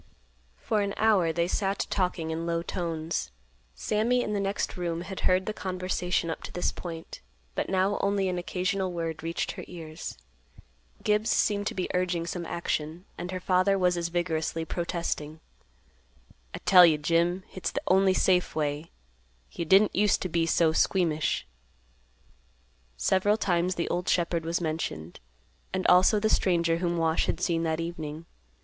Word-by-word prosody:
For 210 - 0
an 200 0 -2
hour 205 -7 +3
they 170 +1 0
sat 195 +1 -1
talking 180 -4 -1
in 165 +1 -3
low 170 0 -1
tones. 165 -2 -3 0.5
Sammy 235 +4 +1
in 210 - -3
the 205 - 0
next 195 0 -2
room 170 -2 -2
had 190 +1 -6
heard 185 +1 +3
the 215 - -2
conversation 185 -3 -2
up - - -5
to - - -7
this 180 - -1
point, 165 -2 -8 0.3
but - - -2
now 190 +2 +1
only 200 -1 +1
an 180 -1 -1
occasional 185 +1 -1
word 165 -2 -4
reached 165 +1 -2
her - - -8
ears. 160 - -8 0.9
Gibbs 210 +1 +2
seemed 205 -1 +1
to - - -3
be 185 - -1
urging 180 -2 0
some 170 -1 -4
action, 165 +1 -3
and 180 - -6
her 185 0 -3
father 185 +2 +2
was 180 -1 +2
as 170 -1 -1
vigorously 165 -1 -1
protesting. 165 -2 -3 1.1
"I - - -6
tell 180 -2 +9
you, 160 -3 +6
Jim, 170 +4 +1
hit's 175 -3 -4
th' - - -8
only 190 0 +4
safe 180 -1 +2
way. 150 +1 -2 0.6
You 170 - -4
didn't 195 +5 +5
use 205 +1 +3
t' - - -3
be 165 -1 0
so 165 -1 +3
squeamish." 160 - +1 1.5
Several 190 - +2
times 180 -2 +1
the 170 - -2
old 180 +1 -1
shepherd 170 -2 +1
was 165 +1 0
mentioned, 155 - -4 0.5
and 185 0 -2
also 185 +4 +5
the 220 - +1
stranger 170 -5 +2
whom 175 0 -1
Wash 165 -1 +1
had - - -1
seen 165 -1 0
that 160 -1 -1
evening. 165 -2 -5
175 Hz, 165 wpm, -28 LUFS, 165-190 Hz, 1.5 s, tell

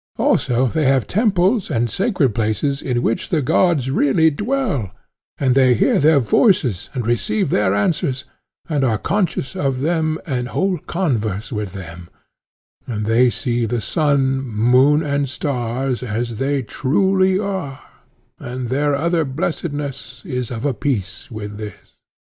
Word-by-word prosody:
Also 125 +1 +2
they 155 +4 0
have 135 -2 +3
temples 200 0 +1
and 120 -5 +1
sacred 165 - 0
places 115 +7 -1
in 125 -2 -1
which 115 - -1
the 165 - +1
gods 140 -2 +2
really 155 +3 +3
dwell, 205 - -1 0.5
and 130 -2 +2
they 130 -2 +4
hear - - +3
their 150 +1 +5
voices 130 - +2
and 125 -3 -2
receive 190 - 0
their 100 -1 +2
answers, 130 +4 0 0.4
and 145 -4 0
are 115 -4 +2
conscious 175 - -1
of 135 -2 -1
them 160 0 0
and 125 -6 -2
hold 185 +3 -1
converse 115 - -1
with 105 -4 -4
them, 85 -2 -9 0.8
and 105 -3 -3
they 120 +3 +4
see 120 -2 -1
the 120 +2 -1
sun, 135 - +1
moon, 130 +5 +3
and 140 -2 -1
stars 130 -2 -2
as 115 -1 -3
they 135 0 0
truly 190 - +1
are, 190 -9 -3 0.6
and 125 0 -5
their 145 +2 +1
other 165 +3 +1
blessedness 145 -1 -4
is 125 - -3
of 120 +2 -5
a 140 - +1
piece 115 -2 -3
with 105 -3 -7
this. 105 -1 -9
135 Hz, 145 wpm, -19 LUFS, 120-155 Hz, 0.8 s, their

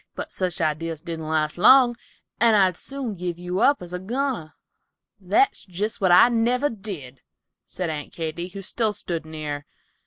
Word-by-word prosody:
But - - -6
such 185 -1 -2
ideas 160 0 -2
didn't 165 -2 -5
last 155 +1 0
long, 245 +3 +7 0.4
and 230 -1 +5
I'd 190 -3 +4
soon 270 +1 -5
give 175 -2 -4
you 180 +1 -3
up 285 -8 +3
as 175 0 -9
a 180 - -3
goner." 235 - -3 0.6
"That's 205 - +2
jest 205 +4 -4
what 185 -2 +3
I 180 - +8
never 245 +4 +1
did," 185 - -7 0.5
said 180 -3 -3
Aunt 150 -1 -6
Katy, 165 +1 -4
who 195 +2 -9
still 220 +2 0
stood 170 -5 -4
near. 150 -2 -5
180 Hz, 165 wpm, -24 LUFS, 160-225 Hz, 0.6 s, I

